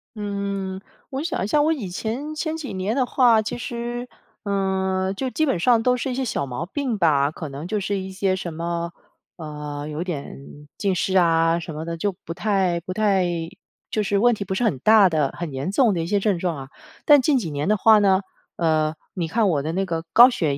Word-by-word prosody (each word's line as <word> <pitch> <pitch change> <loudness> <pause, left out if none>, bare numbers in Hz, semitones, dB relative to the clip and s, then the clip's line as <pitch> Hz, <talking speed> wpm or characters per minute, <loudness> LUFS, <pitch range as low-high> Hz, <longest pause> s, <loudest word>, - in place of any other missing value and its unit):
嗯， 200 -2 -3 0.3
我 275 +2 -3
想 335 - -2
一 - - -1
下 295 +7 +3
我 310 +2 +3
以 230 - -3
前 235 +11 -4
前 315 +1 -3
几 290 -9 -6
年 190 +4 -2
的 260 -2 +2
话 240 -4 +4
其 215 - -4
实， 240 0 -5 0.4
嗯， 190 -1 0
就 260 +5 -2
基 315 +5 0
本 195 - 0
上 230 +3 +3
都 250 +1 +3
是 260 +1 -3
一 - - -3
些 265 0 -1
小 140 - -2
毛 130 +5 -4
病 255 +3 -2
吧， 145 -6 +3
可 155 -1 -7
能 145 +5 -7
就 210 +2 -1
是 200 0 -2
一 190 0 -6
些 190 0 0
什 180 -2 -5
么， 170 +1 -3 0.4
呃， 150 -2 -6
有 155 +3 -4
点 145 -3 -8
近 195 -2 0
视 190 +2 -1
啊 165 -1 +3
什 160 -1 -7
么 155 +2 -5
的， 170 0 -4
就 200 +5 0
不 165 - -4
太， 185 -2 +1
不 180 +2 -6
太 200 -3 +2 0.7
就 215 - 0
是 205 -1 0
问 240 +3 +4
题 205 - -3
不 190 0 -3
是 245 - 0
很 150 - +1
大 215 +4 +6
的、 155 -5 +1
很 170 -5 -5
严 135 +6 -3
重 230 0 +3
的 170 - -1
一 165 - -3
些 205 +2 +1
症 195 -3 +1
状 170 -3 -1
啊。 135 -1 -8 0.4
但 290 -2 +7
近 275 +2 +3
几 180 -11 -3
年 145 +2 -2
的 215 - +3
话 220 +1 +6
呢， 195 -2 +3 0.3
呃， 155 -2 +1 0.2
你 170 -4 -2
看 220 +3 +1
我 150 -5 +1
的 155 +3 -3
那 195 +1 0
个 165 -3 -3
高 245 +2 +9
血 150 -10 -1
190 Hz, 245 characters per minute, -23 LUFS, 165-225 Hz, 0.7 s, 高